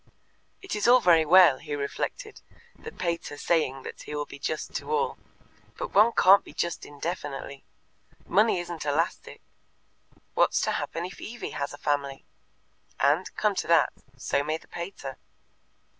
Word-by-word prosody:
"It 385 - -4
is 210 - 0
all 250 +1 +8
very 165 -6 +5
well," 175 -5 +7
he 150 -1 -5
reflected, 145 - -4 0.3
"the 455 - -10
pater 170 - -3
saying 135 -5 0
that - - -8
he 150 - -7
will 145 0 -2
be 140 - -11
just 155 +2 -4
to - - -7
all, 460 +1 0 0.6
but - - -5
one 215 +4 +6
can't 195 +2 +6
be - - -13
just 170 -1 -3
indefinitely. 145 -2 -6 0.6
Money 210 +1 +3
isn't 175 -2 -6
elastic. 150 +3 -2 0.9
What's - - +3
to - - 0
happen 170 - -3
if 185 - -9
Evie 240 +2 -6
has 140 - -3
a 145 - -9
family? 140 -2 -2 0.7
And, 150 +7 +2
come 210 -1 +1
to 185 - -3
that, 165 -3 +4 0.2
so 140 +2 0
may 155 +2 -1
the - - -21
pater. 170 -7 -7
165 Hz, 160 wpm, -27 LUFS, 145-190 Hz, 0.9 s, all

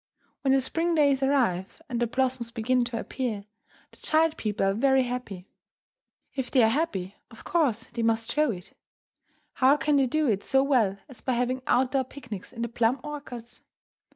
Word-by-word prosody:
When 270 - +2
the 270 - +4
spring 330 +6 0
days 280 -3 +3
arrive 245 - +1
and 245 -3 -3
the 240 - +1
blossoms 255 -1 0
begin 245 +2 +1
to 235 -1 -4
appear, 225 -7 -4 0.5
the - - -20
child 315 0 +2
people 210 -2 -1
are 195 - +2
very 265 +4 +3
happy. 245 -7 -5 0.9
If 265 -2 -3
they 255 -4 +4
are 220 - +5
happy, 205 - -2
of 230 - -14
course 265 -10 +1
they 235 - -6
must 225 0 +1
show 300 -1 +2
it. 180 -4 -6 0.8
How 270 +3 +4
can 295 -1 +2
they 270 -2 +3
do 310 +5 +1
it 205 -6 +1
so 270 0 +3
well 235 -9 +2
as 260 -5 -11
by 255 - -1
having 250 +2 0
out 255 0 +3
door 270 -1 +2
picnics 255 -6 -9
in 235 -2 -5
the - - -1
plum 235 +2 +1
orchards? 265 -6 -8
250 Hz, 185 wpm, -27 LUFS, 225-275 Hz, 0.9 s, are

